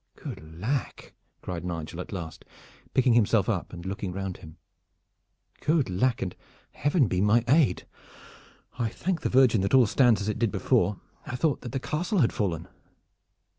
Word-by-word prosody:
"Good 80 +1 -9
lack!" 130 +7 -3 0.3
cried 85 -2 -5
Nigel 85 -1 -5
at - - -9
last, 85 -6 -6 0.5
picking 130 -2 +4
himself 110 -3 +3
up 100 -6 -2
and 85 -1 -9
looking 95 0 -4
round 95 0 -4
him. 80 -1 -13 1.0
"Good 150 - +1
lack, 115 +7 +1
and 90 - -5 0.4
Heaven 145 -1 +2
be 90 -1 0
my 110 +3 +4
aid! 135 - +3 1.0
I 115 -2 +1
thank 180 +9 -2
the - - -1
Virgin 125 -5 +4
that 100 +6 +2
all 130 -2 +7
stands 120 0 +4
as 100 - -3
it 105 - -2
did 115 -4 +1
before. 100 +2 +1 0.3
I 130 - -4
thought 140 +2 0
that 120 - -7
the 135 - -2
castle 175 - -2
had 120 - +2
fallen." 90 -7 -2
110 Hz, 170 wpm, -27 LUFS, 90-130 Hz, 1.0 s, all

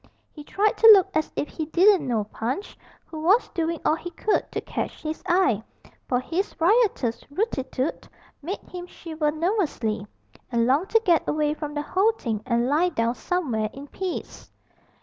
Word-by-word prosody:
He 300 - -11
tried 410 +7 0
to 455 - +6
look 380 -2 +3
as 310 0 0
if 295 - -1
he 315 0 -5
didn't 360 -2 +4
know 225 -4 0
Punch, 240 - -4 0.3
who 315 - -8
was 390 +9 +3
doing 335 -3 -2
all - - +4
he 335 +2 -4
could 415 +5 -1
to - - -2
catch - - -5
his 310 0 -4
eye, 350 - +3 0.5
for 245 - +1
his 340 +10 -3
riotous 365 - +2
'rootitoot' 285 - -2 0.3
made 360 +8 -4
him 355 -1 -8
shiver 315 -4 -3
nervously, 305 - -1 0.4
and 235 -1 +2
long 280 +9 +2
to 450 - +4
get 340 -3 +3
away 300 0 +1
from 300 -1 -6
the 295 - -2
whole 395 +8 +2
thing 225 - -3
and 235 0 +1
lie 315 +6 +2
down 235 -8 0
somewhere 250 - -1
in 275 +1 -9
peace. 375 -2 -6
315 Hz, 170 wpm, -25 LUFS, 260-365 Hz, 0.5 s, to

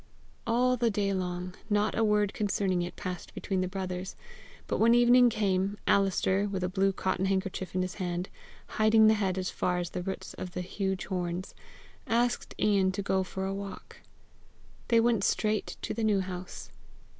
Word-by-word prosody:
All 250 +2 +3
the 235 -1 +2
day 200 -2 0
long, 180 -1 -3 0.2
not 210 0 +1
a 225 - +2
word 210 -2 +2
concerning 195 -3 0
it 175 0 -5
passed 185 -3 -6
between 190 -2 -1
the 185 - 0
brothers; 185 -1 -4 0.5
but - - -2
when 230 +2 +5
evening 245 +1 +6
came, 200 -2 0
Alister, 195 0 +2
with 190 -2 -3
a 180 - 0
blue 195 +1 +2
cotton 190 0 -1
handkerchief 190 -1 -2
in 185 - +2
his 185 - -4
hand, 180 -1 -3 0.4
hiding 220 0 +4
the 215 - +7
head 195 -3 0
as 185 -1 -2
far 180 0 0
as 175 -1 -3
the 180 - -3
roots 190 +1 -5
of 180 -1 -6
the 180 - -3
huge 190 +1 -3
horns, 180 -1 -3 0.5
asked 240 +1 0
Ian 195 -3 +3
to 200 - -3
go 190 -1 +1
for 190 +1 -4
a 195 - -2
walk. 195 0 -8 0.9
They 230 -1 +4
went 230 -3 +2
straight 215 +1 0
to - - -2
the 230 - -3
New 210 -3 +3
House. 185 -1 -7
195 Hz, 180 wpm, -29 LUFS, 185-210 Hz, 0.9 s, the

